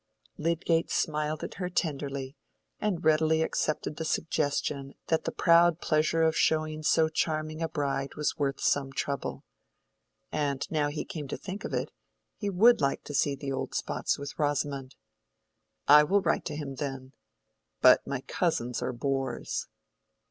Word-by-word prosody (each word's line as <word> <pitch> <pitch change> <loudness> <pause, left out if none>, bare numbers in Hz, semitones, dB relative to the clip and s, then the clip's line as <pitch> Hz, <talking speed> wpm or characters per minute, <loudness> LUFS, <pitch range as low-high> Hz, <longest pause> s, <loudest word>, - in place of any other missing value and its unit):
Lydgate 165 +1 +1
smiled 150 0 -1
at - - -5
her 180 - -1
tenderly, 140 -5 -2 0.4
and 190 -5 -1
really 160 0 +4
accepted 155 -1 -1
the 160 - -3
suggestion 145 -3 -1
that 160 - +1
the - - -1
proud 170 -1 +4
pleasure 155 +1 +2
of 160 0 +3
showing 155 0 +1
so 160 +1 +3
charming 155 0 -2
a 165 - -1
bride 140 -2 -2
was 150 -1 -1
worth 140 -2 -1
some 135 -1 +1
trouble. 140 +1 -3 0.9
And 140 -3 -1
now 150 -2 +1
he 145 +1 -4
came 150 -4 -6
to - - -4
think 195 +1 -7
of - - -5
it, - - -2 0.4
he 205 - -3
would 210 +2 +5
like 140 -1 0
to 145 - -8
see 140 0 +2
the 140 0 -5
old 135 0 -3
spots - - -1
with 140 +2 -7
Rosamond. 145 -2 -1 0.9
"I 150 +1 +9
will 200 +7 +2
write - - +1
to 150 - -4
him, 140 -3 -5
then. 135 -2 -5 0.7
But - - +6
my - - -2
cousins 120 0 -1
are 130 - -2
bores." 135 +2 -2
150 Hz, 155 wpm, -29 LUFS, 140-160 Hz, 0.9 s, I